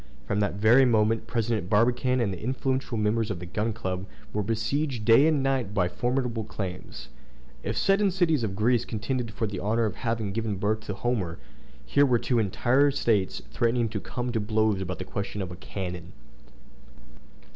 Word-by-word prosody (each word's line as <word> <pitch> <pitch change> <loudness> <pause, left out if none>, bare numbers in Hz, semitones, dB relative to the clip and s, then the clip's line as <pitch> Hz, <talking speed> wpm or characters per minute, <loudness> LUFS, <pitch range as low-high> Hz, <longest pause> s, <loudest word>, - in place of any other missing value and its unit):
From 100 +4 -1
that 100 -2 0
very 110 +6 +6
moment 110 -2 +2
President 115 -5 -1
Barbicane 120 +4 +2
and 105 -5 0
the 90 - -8
influential 130 0 -1
members 105 +1 +1
of 100 - -2
the 90 - -7
Gun 105 +5 -1
Club 95 -3 -4 0.3
were 105 - 0
besieged 115 +4 -1
day 120 +7 +7
and 150 -4 +2
night 130 -7 0
by 90 -3 +2
formidable 120 +3 -1
claims. 95 -6 -6 0.5
If - - -3
seven 195 +1 +3
cities 170 -8 +1
of 100 -3 -2
Greece 115 +4 +2
contended 120 +1 -3
for 110 +1 -2
the 100 -3 -4
honor 110 +5 +1
of 105 - -3
having 115 -4 -2
given 110 0 -2
birth 105 +3 0
to 100 - -2
a - - -8
Homer, 100 -7 -1 0.5
here 145 0 +4
were 125 -2 +4
two 120 +1 0
entire 120 +7 +3
States 110 -8 0
threatening 115 0 +1
to 105 -1 -3
come 120 +4 -4
to 115 - 0
blows 110 -1 +1
about 90 -1 -4
the 95 - -6
question 100 +2 -4
of 95 -2 -4
a - - -6
cannon. 90 -1 -6
110 Hz, 185 wpm, -27 LUFS, 100-125 Hz, 0.5 s, day